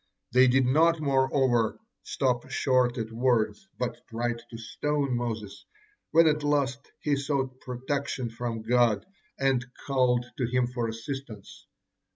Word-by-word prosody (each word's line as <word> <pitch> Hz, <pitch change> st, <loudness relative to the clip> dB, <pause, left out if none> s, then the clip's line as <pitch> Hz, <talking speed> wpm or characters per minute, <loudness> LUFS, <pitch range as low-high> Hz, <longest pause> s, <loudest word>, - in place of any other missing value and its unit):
They 130 Hz, +1 st, +6 dB
did 130 Hz, +1 st, +4 dB
not, 160 Hz, +6 st, +4 dB
moreover, 130 Hz, -5 st, +2 dB, 0.2 s
stop 125 Hz, -1 st, -1 dB
short 130 Hz, -2 st, +2 dB
at 110 Hz, -1 st, -3 dB
words, 120 Hz, -, +1 dB
but 125 Hz, -1 st, -3 dB
tried 120 Hz, 0 st, -2 dB
to 115 Hz, -, -8 dB
stone 140 Hz, +4 st, -1 dB
Moses, 115 Hz, -4 st, -4 dB, 0.5 s
when 165 Hz, +1 st, +6 dB
at 150 Hz, -1 st, +3 dB
last 140 Hz, -2 st, 0 dB
he 145 Hz, -1 st, +1 dB
sought 135 Hz, -2 st, -2 dB
protection 130 Hz, -1 st, -3 dB
from 115 Hz, -1 st, -4 dB
God 115 Hz, -3 st, +3 dB, 0.3 s
and 135 Hz, -2 st, +2 dB, 0.2 s
called 125 Hz, -3 st, +2 dB
to 125 Hz, -, +1 dB
Him 125 Hz, +1 st, +1 dB
for 120 Hz, -1 st, -2 dB
assistance. 110 Hz, -5 st, -7 dB
125 Hz, 135 wpm, -28 LUFS, 120-135 Hz, 0.5 s, They